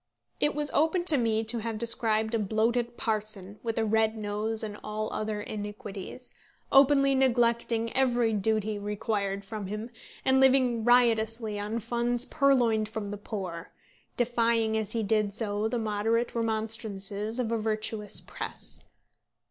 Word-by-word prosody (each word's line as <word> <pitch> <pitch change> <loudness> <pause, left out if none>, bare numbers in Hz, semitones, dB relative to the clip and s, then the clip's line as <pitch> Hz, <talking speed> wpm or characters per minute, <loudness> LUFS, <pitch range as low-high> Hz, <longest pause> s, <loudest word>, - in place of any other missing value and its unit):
It 295 - +2
was 295 0 0
open 325 +4 +2
to 325 -5 +4
me 225 -2 +1
to 225 +1 0
have 225 0 -3
described 220 -1 +1
a 230 - +2
bloated 230 +3 0
parson, 210 -2 -3
with 225 -1 -3
a 225 - +2
red 220 +1 +2
nose 215 +1 -2
and 210 -1 -5
all 215 0 -3
other 215 -1 -2
iniquities, 205 +2 -7 0.4
openly 275 0 +6
neglecting 235 -3 +2
every 245 -4 +2
duty 215 0 0
required 200 -1 -2
from 210 -1 -5
him, 215 +4 -5 0.3
and 265 0 +4
living 255 -3 +4
riotously 225 -3 +3
on 210 +3 -3
funds 240 +2 0
purloined 240 -7 +2
from 215 -2 -5
the 205 - -4
poor, 190 -5 -6 0.4
defying 230 -2 +2
as 215 -1 -1
he 230 -1 0
did 215 +1 +2
do 200 - -12
so 210 -1 0
the 245 - -1
moderate 225 +2 0
remonstrances 220 -1 -2
of 235 -2 -1
a 230 - +1
virtuous 215 -1 -1
press. - - -7
220 Hz, 150 wpm, -28 LUFS, 210-235 Hz, 0.4 s, openly